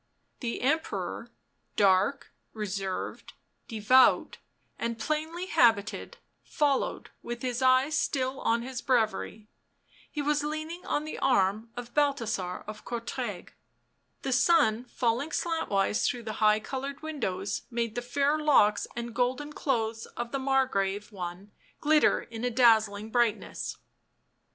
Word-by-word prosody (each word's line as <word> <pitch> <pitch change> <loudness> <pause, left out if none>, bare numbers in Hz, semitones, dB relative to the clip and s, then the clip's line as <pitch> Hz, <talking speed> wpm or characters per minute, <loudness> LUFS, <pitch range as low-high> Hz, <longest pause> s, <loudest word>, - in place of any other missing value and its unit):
The 235 -3 -3
Emperor, 315 +5 -1 0.5
dark, 200 +6 +2 0.2
reserved, 195 -3 -4 0.3
devout 230 +3 +4 0.4
and 235 -1 -2
plainly 310 +8 -2
habited, 230 - +2 0.3
followed 285 -3 0
with 240 +1 -6
his 250 -1 -2
eyes 260 +4 +4
still 260 -1 -1
on 230 +1 +1
his 260 0 -5
breviary; 220 -4 0 0.6
he 300 - -6
was 295 +1 +1
leaning 310 +3 -4
on 295 - 0
the 310 - -6
arm 215 -3 +2
of 240 -1 -7
Balthasar 230 -11 0
of 215 0 -8
Courtrai; 235 -4 -5 0.7
the 270 - 0
sun 245 -4 +3
falling 245 +4 -1
slantwise 305 - 0
through 245 -1 -2
the 220 -1 -4
high 215 0 +5
coloured 275 +6 -5
windows 205 -11 -3
made 235 -2 -2
the 245 - -3
fair 280 +5 +1
locks 240 -9 +4
and 235 -1 -5
golden 255 +5 -1
clothes 225 -6 -1
of 240 0 -4
the 275 - -1
Margrave 230 -7 0
one 185 +1 -7 0.3
glitter 305 0 +4
in 230 0 -8
a 250 - +1
dazzling 220 -3 +3
brightness. 235 -3 0
240 Hz, 125 wpm, -28 LUFS, 215-280 Hz, 0.7 s, high